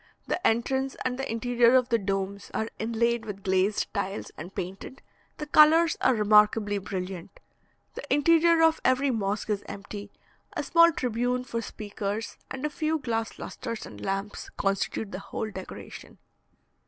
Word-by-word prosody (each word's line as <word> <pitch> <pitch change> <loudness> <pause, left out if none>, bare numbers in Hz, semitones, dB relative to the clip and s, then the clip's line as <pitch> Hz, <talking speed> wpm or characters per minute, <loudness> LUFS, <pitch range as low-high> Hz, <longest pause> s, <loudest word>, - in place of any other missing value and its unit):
The 360 - 0
entrance 265 +4 0
and 255 0 -1
the 270 - -3
interior 240 +1 +3
of 255 -1 +3
the 230 -2 +3
domes 195 0 -3
are 220 +1 -1
inlaid 235 +1 0
with 200 -3 -7
glazed 190 +2 +1
tiles 200 0 -3
and 175 +5 -9
painted, 190 +8 -6 0.3
the 300 - -4
colours 315 +2 +6
are 260 - +4
remarkably 210 -1 +4
brilliant. 185 - -6 0.5
The - - -8
interior 330 +2 +5
of 325 0 +4
every 265 +1 +3
mosque 210 -1 -2
is 205 -1 0
empty; 200 0 -8 0.4
a - - -2
small 335 0 +6
tribune 250 -2 -1
for 230 -2 -3
speakers, 210 0 -5
and 265 +2 -4
a - - 0
few 315 +1 0
glass 225 -6 -3
lustres 230 -2 -6
and 105 -1 -10
lamps, 195 +1 -3
constitute 195 +1 -1
the - - -5
whole 215 +2 -5
decoration. 190 -1 -9
225 Hz, 155 wpm, -27 LUFS, 200-260 Hz, 0.5 s, colours